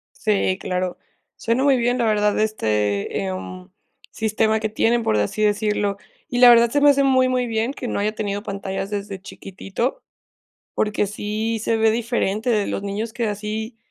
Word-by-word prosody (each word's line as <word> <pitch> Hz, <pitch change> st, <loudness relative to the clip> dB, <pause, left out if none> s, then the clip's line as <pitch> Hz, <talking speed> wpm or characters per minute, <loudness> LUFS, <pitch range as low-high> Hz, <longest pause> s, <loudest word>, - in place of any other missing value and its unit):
Sí, 200 Hz, -3 st, +1 dB
claro. 180 Hz, 0 st, -2 dB, 0.4 s
Suena 235 Hz, +4 st, 0 dB
muy 275 Hz, -2 st, +5 dB
bien, 245 Hz, +1 st, +1 dB
la 235 Hz, -, +1 dB
verdad 210 Hz, -1 st, +2 dB
este, 105 Hz, -, 0 dB
em, 185 Hz, 0 st, -6 dB, 0.4 s
sistema 220 Hz, 0 st, 0 dB
que 220 Hz, -, -1 dB
tienen, 230 Hz, +2 st, +1 dB
por 110 Hz, -, +1 dB
así 105 Hz, -, -1 dB
decirlo. 210 Hz, -1 st, +1 dB, 0.3 s
Y 245 Hz, -, -2 dB
la 245 Hz, -1 st, +9 dB
verdad 235 Hz, 0 st, +6 dB
se 285 Hz, -, +1 dB
me 290 Hz, 0 st, +7 dB
hace 280 Hz, 0 st, +3 dB
muy, 260 Hz, -1 st, +3 dB
muy 250 Hz, -1 st, 0 dB
bien 225 Hz, +3 st, -1 dB
que 255 Hz, -3 st, -6 dB
no -, -, -2 dB
haya 210 Hz, +1 st, -1 dB
tenido 205 Hz, -1 st, -3 dB
pantallas 195 Hz, -1 st, -4 dB
desde 200 Hz, -2 st, -5 dB
chiquitito, 195 Hz, -, -5 dB, 0.7 s
porque 210 Hz, -1 st, 0 dB
sí 215 Hz, +2 st, -3 dB
se 225 Hz, +1 st, 0 dB
ve 220 Hz, 0 st, +3 dB
diferente 230 Hz, -1 st, -1 dB
de 210 Hz, -3 st, +1 dB
los 195 Hz, -, -3 dB
niños 210 Hz, +3 st, -4 dB
que 240 Hz, -2 st, -2 dB
así 215 Hz, +3 st, -4 dB
215 Hz, 175 wpm, -22 LUFS, 200-235 Hz, 0.7 s, la